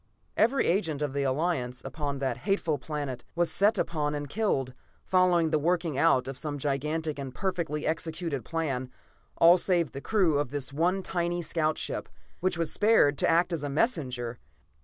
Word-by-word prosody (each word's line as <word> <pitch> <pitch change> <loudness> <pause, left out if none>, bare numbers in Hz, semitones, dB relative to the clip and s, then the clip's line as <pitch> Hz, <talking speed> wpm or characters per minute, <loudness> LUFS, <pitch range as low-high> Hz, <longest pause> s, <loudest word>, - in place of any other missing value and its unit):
"Every 250 +5 +3
agent 165 -5 0
of 145 -2 -2
the 140 - -1
Alliance 135 -3 -1
upon 140 0 -3
that 130 -3 -2
hateful 155 0 0
planet 145 -4 -4
was 175 0 +1
set 205 +2 +3
upon 150 -4 -1
and 145 0 -4
killed, 140 - -1 0.3
following 180 -3 +3
the 155 - +3
working 165 -1 0
out 140 -3 +3
of 135 -1 -5
some 150 -2 -3
gigantic 150 +2 -2
and 135 -2 -6
perfectly 170 -3 -2
executed 160 -3 -2
plan 135 -4 -2 0.5
all 170 +2 +7
save 175 -6 +1
the 140 - -7
crew 180 -8 +2
of 145 - -1
this 140 -1 -4
one 180 +6 +1
tiny 175 -1 -1
scout 155 -1 0
ship, - - -4 0.3
which 185 -1 0
was 165 -2 -1
spared 205 -9 +4
to - - +2
act 170 +2 +3
as 165 - -2
a 145 - -3
messenger. 130 - -1
155 Hz, 175 wpm, -28 LUFS, 140-175 Hz, 0.5 s, all